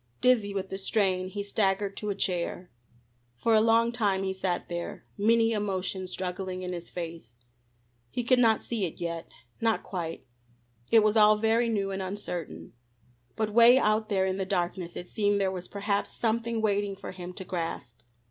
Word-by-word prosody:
Dizzy 230 -5 +3
with 195 -1 -4
the 195 - -4
strain 190 -2 +1
he 200 +2 -4
staggered 200 -1 0
to 210 - -3
a 200 - -1
chair. 180 -1 -2 0.6
For 225 - +1
a 215 - +6
long 230 +1 +4
time 205 -5 0
he 190 0 -1
sat 185 -2 -2
there, 175 0 -5
many 225 +2 +3
emotions 190 -3 -2
struggling 185 0 -3
in 180 0 -3
his 175 -1 -6
face. 165 -8 -7 0.8
He 245 - -3
could 250 +1 +4
not 225 -3 +4
see 225 -5 -1
it 165 - -6
yet 170 -1 -4 0.3
not 225 -1 +1
quite. 165 -6 -5 0.6
It 225 -2 +6
was 215 0 +3
all 215 -1 +7
very 225 +2 +2
new, 200 -3 0
and 195 0 -3
uncertain. 185 -3 -5 0.6
But 215 -1 -1
'way 235 +2 +8
out 215 -2 +2
there 190 -2 +2
in 190 0 -1
the 195 - -1
darkness 180 -2 -2
it 180 - -6
seemed 205 0 +1
there 195 -1 +1
was 180 -1 -6
perhaps 200 0 -1
something 230 0 -1
waiting 205 -1 +1
for 195 - -8
him 180 -1 -7
to 190 - -7
grasp. 165 -9 -4
200 Hz, 180 wpm, -28 LUFS, 185-220 Hz, 0.8 s, way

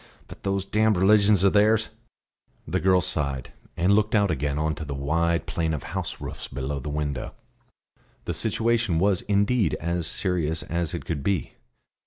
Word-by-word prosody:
But - - -12
those 95 -1 -1
damned 110 0 +2
religions 100 0 +5
of 100 - +4
theirs 110 +1 +3 0.4
" - - -41
The - - 0
girl 95 -1 +4
sighed, 70 -7 -3 0.2
and 90 +3 +3
looked 105 +2 +2
out 100 -3 +3
again 70 -1 -1
on 80 +1 0
to 80 - -6
the 70 -2 -5
wide 85 +4 0
plain 80 -1 -1
of 75 - -6
house - - -5
roofs - - -7
below 70 +2 -4
the 70 - -6
window. 75 -2 -3 0.9
The 85 - -2
situation 110 +1 0
was 95 +1 +2
indeed 100 -1 +1
as 85 0 -2
serious 85 -4 -1
as 85 0 -2
it 85 - -6
could 80 -4 -3
be. 95 -3 -1
85 Hz, 175 wpm, -25 LUFS, 75-100 Hz, 0.9 s, religions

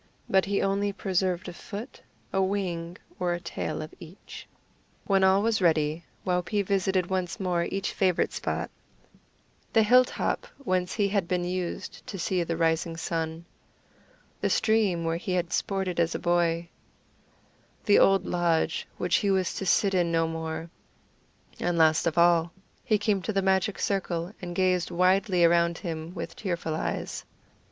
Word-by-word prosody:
But 190 -1 +3
he 200 0 0
only 200 +1 +1
preserved 185 -2 -1
a 180 - -6
foot, 210 +7 -8 0.3
a 195 - +2
wing, 180 -3 -2 0.2
or 180 -1 +1
a - - -5
tail 170 -2 -4
of 155 - -10
each. 170 +3 -11 0.6
When 195 -1 +3
all 190 +1 +4
was 225 -2 +1
ready, 160 -1 +2 0.2
Waupee 180 +3 0
visited 190 -1 +1
once 185 -2 -2
more 175 -3 0
each 195 0 -3
favorite 185 -3 +1
spot - - -3 1.0
the 225 - +5
hill 250 +4 +6
top - - -2
whence 185 -9 -1
he 205 -2 +1
had 195 -4 0
been 180 0 0
used 175 -2 -4
to 195 - -5
see 180 0 0
the 165 -1 -2
rising 165 0 0
sun; 165 0 -3 0.9
the - - 0
stream 210 -6 +2
where 165 0 0
he 185 +2 -3
had 175 -1 -1
sported 190 -3 -1
as 170 0 +1
a - - +1
boy; 170 -1 +1 1.2
the 205 - +6
old 195 0 +4
lodge, 170 -2 0
which 180 -1 +2
he 200 - 0
was 190 -2 +1
to 195 - -4
sit 195 +1 +3
in 175 -2 +2
no 165 0 +2
more; 160 0 -5 0.9
and 175 -1 0
last 160 0 +4
of 165 - -1
all, 170 -1 +4 0.3
he 215 -4 +2
came 205 -1 0
to 220 - -2
the 195 -1 +1
magic 190 +1 +1
circle, 180 -2 -2
and 175 -1 -6
gazed 185 -2 +2
widely 185 +1 +3
around 170 0 +3
him 165 -2 -5
with 165 - -6
tearful 170 -5 -3
eyes. 155 - -3
180 Hz, 160 wpm, -27 LUFS, 170-195 Hz, 1.2 s, hill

